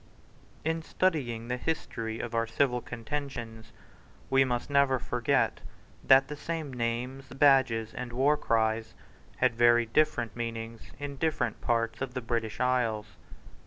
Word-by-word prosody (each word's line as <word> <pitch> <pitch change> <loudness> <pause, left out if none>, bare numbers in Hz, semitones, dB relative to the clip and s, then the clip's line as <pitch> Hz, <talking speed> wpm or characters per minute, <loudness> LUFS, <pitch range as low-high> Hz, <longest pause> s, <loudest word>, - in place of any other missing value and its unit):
In 160 0 0
studying 135 -11 -1
the 125 +1 -1
history 115 -5 -3
of 120 -1 -5
our 115 0 +1
civil 125 +1 +1
contentions, 120 -3 -6 0.6
we 135 0 +6
must 125 -2 -2
never 140 -2 +3
forget 125 +2 0 0.4
that 135 0 +6
the 150 - -5
same 155 -2 -4
names, 125 +3 -3
badges, 130 -4 +3
and 125 -1 -5
warcries 115 -4 +1 0.4
had - - +3
very 120 0 +5
different 120 -2 +1
meanings 115 -1 -5
in 145 -1 -6
different 130 -7 -1
parts 115 0 0
of 135 -1 -4
the 130 - -2
British 115 -2 -2
isles. 120 -4 +1
125 Hz, 130 wpm, -29 LUFS, 115-135 Hz, 0.6 s, we